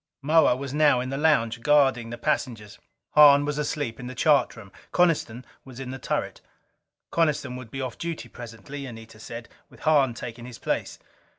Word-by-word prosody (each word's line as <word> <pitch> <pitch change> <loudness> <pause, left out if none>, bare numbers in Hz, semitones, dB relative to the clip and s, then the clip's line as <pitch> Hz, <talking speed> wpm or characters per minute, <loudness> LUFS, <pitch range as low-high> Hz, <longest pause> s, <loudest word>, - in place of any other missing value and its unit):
Moa 155 -3 +4
was 135 +1 -6
now 145 -4 +4
in 125 +1 -3
the - - -2
lounge, 120 -7 +2
guarding 135 -5 +3
the 120 - -6
passengers. 120 -6 -3 0.3
Hahn 145 -1 +7
was 150 0 -2
asleep 145 -5 -3
in 125 - -7
the 130 - -7
chart 150 +3 +3
room. 105 -4 -12 0.2
Coniston 150 -9 +1 0.2
was 130 -1 -12
in 130 -1 -6
the 130 - -7
turret. - - -3 0.7
Coniston 150 -6 0
would 125 -3 -9
be 135 +3 -5
off 130 -3 -5
duty 170 -1 -5
presently, 120 +4 -9
Anita 115 -2 -11
said, 115 +1 -8 0.2
with - - -18
Hahn 145 -6 +3
taking 120 0 -8
his 125 -2 -10
place. - - -3
130 Hz, 180 wpm, -25 LUFS, 115-145 Hz, 0.7 s, Hahn